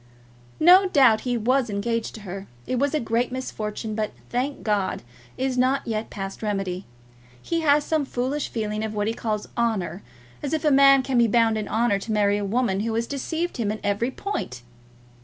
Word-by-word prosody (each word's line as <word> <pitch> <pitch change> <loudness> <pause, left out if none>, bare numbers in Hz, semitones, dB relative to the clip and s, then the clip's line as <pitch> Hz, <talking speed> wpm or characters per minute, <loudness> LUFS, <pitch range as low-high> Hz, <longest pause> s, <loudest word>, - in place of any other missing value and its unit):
No 365 +4 +7
doubt 255 -9 +5
he 245 - +1
was 250 +2 +1
engaged 225 +3 -2
to 220 - -9
her. 195 0 -7 0.2
It 255 - -1
was 285 +2 +1
a - - +2
great 235 +1 0
misfortune, 220 -4 -4
but, 215 0 -2 0.2
thank 260 +4 -2
God, 205 - 0 0.3
is 260 -1 -1
not 265 +2 +2
yet 220 -1 -3
past 195 -1 -6
remedy. 195 -3 -3 0.5
He 335 - -2
has 295 -1 +4
some 310 -2 0
foolish 265 +3 -2
feeling 215 -1 -3
of 220 -1 -4
what 205 0 0
he 225 - 0
calls 215 -2 -3
honour; 205 -7 -1 0.4
as 290 +1 -3
if 315 0 -1
a 300 - +4
man 275 -1 +6
can 255 -2 +1
be 235 - +5
bound 225 0 +3
in 215 -1 -3
honour 220 -2 +1
to 220 - -6
marry 205 -1 +2
a - - -3
woman 200 -2 0
who 225 +2 -1
has 230 +1 0
deceived 320 +6 -3
him 215 -4 0
in 215 - -4
every 205 +4 0
point! 260 - -5
230 Hz, 195 wpm, -24 LUFS, 210-265 Hz, 0.5 s, No